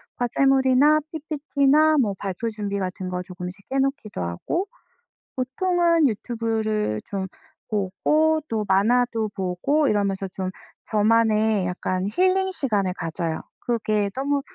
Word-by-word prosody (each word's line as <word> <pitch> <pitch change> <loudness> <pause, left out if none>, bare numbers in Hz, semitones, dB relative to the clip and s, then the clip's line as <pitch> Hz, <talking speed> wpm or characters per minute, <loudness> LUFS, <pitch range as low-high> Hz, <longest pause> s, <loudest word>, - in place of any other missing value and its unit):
과제물이나 270 +4 +3
PPT나 305 -1 +2
뭐 210 -5 0
발표 200 +4 -3
준비 205 -2 -3
같은 185 0 -4
거 180 0 -3
조금씩 180 +1 -8
해 270 - +2
놓기도 270 - -2
하고 85 - -2 0.7
보통은 335 +4 +2
유튜브를 220 - -1
좀 195 -1 -4 0.4
보고 300 +11 +1
또 220 -2 -2
만화도 225 +3 +2
보고 195 +12 +1
이러면서 200 -3 0
좀 185 0 -4 0.4
저만의 215 -2 +2
약간 185 +1 -2
힐링 375 - +2
시간을 205 - 0
가져요. 165 -1 -3 0.2
그게 215 -3 0
너무 280 +2 0
220 Hz, 265 characters per minute, -24 LUFS, 195-275 Hz, 0.7 s, 과제물이나